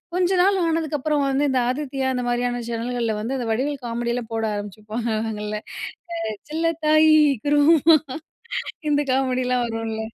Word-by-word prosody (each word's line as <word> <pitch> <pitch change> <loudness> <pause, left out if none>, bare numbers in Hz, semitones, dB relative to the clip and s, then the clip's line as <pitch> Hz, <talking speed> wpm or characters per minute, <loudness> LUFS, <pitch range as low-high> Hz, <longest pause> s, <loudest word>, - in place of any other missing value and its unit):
கொஞ்ச 365 0 +2
நாள் 390 0 +3
ஆனதுக்கப்புறம் 305 -3 0
வந்து 275 +2 +1
இந்த 260 -1 +2
ஆதித்யா 265 0 -2
அந்த 250 -1 -2
மாரியான 245 0 -1
சேனல்கள்ல 235 -1 -2
வந்து, 235 +6 -3
அந்த 245 - -3
வடிவேல் 270 +3 -2
காமெடிலாம் 235 0 -3
போட 225 0 -1
ஆரம்பிச்சுப்பாங்கல்ல, 215 +1 -3 0.9
செல்லத்தாயி! 315 -1 +3 0.3
குருவம்மா! 300 +2 +5 0.9
இந்த 290 - +3
காமெடில்லாம் 255 -2 +1
வரும்ல. 225 -1 -4
250 Hz, 120 wpm, -23 LUFS, 230-295 Hz, 0.9 s, குருவம்மா